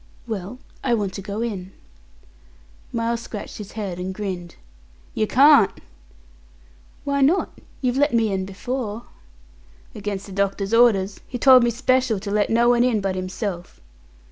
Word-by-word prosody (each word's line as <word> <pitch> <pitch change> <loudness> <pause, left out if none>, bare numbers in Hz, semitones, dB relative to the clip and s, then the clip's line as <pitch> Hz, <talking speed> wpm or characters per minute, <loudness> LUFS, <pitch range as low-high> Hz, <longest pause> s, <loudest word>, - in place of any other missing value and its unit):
"Well, 215 0 -5 0.3
I 245 -3 +2
want 200 -4 -2
to 195 - -6
go 205 +2 -5
in." 195 -5 -5 1.2
Miles 230 0 -1
scratched 215 -2 -8
his 205 -2 -9
head, 195 -5 -4
and 185 +1 -4
grinned. 185 -4 -5 0.6
"Yer 215 - 0
carn't." 275 -3 +6 1.3
"Why 280 0 0
not? 315 +8 +1 0.2
You've 250 -1 0
let 290 +2 +3
me 225 -3 +2
in 190 -1 -1
before." 225 +3 -4 0.9
"Against 205 -2 -5
the 200 - -11
doctor's 195 +1 -1
orders. 205 -5 +4
He 250 - -5
told 255 -1 +7
me 240 - +3
special 255 -2 +1
to 200 +1 -6
let 205 0 +1
no 235 +1 +3
one 240 0 +4
in 245 -4 +2
but 195 -1 -1
himself." 185 -1 -5
215 Hz, 150 wpm, -22 LUFS, 195-245 Hz, 1.3 s, told